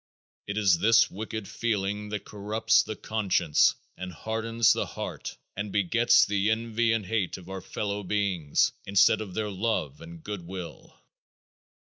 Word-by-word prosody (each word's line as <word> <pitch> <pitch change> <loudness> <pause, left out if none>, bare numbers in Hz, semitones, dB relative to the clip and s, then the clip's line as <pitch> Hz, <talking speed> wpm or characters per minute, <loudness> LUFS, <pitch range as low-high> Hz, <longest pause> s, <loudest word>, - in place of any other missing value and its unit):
It 100 +1 -3
is 95 -5 +4
this 115 +3 +5
wicked 110 +1 -5
feeling 105 -2 -2
that 105 0 -4
corrupts 105 +2 +2
the 110 - -5
conscience 100 -9 +2 0.2
and 90 0 -6
hardens 115 +5 +1
the - - -2
heart - - -6 0.2
and 100 +1 -4
begets 105 +5 +4
the 100 +1 0
envy 115 +1 +1
and 110 -3 0
hate 105 -2 -1
of 90 -2 -13
our 95 0 -5
fellow 100 +2 -3
beings, 95 -6 +1 0.2
instead 100 +2 +4
of 100 -4 -7
their 105 -1 -2
love 95 -8 -2
and 85 -1 -11
good 105 -3 -5
will. 90 -2 -9
105 Hz, 150 wpm, -27 LUFS, 95-110 Hz, 0.2 s, this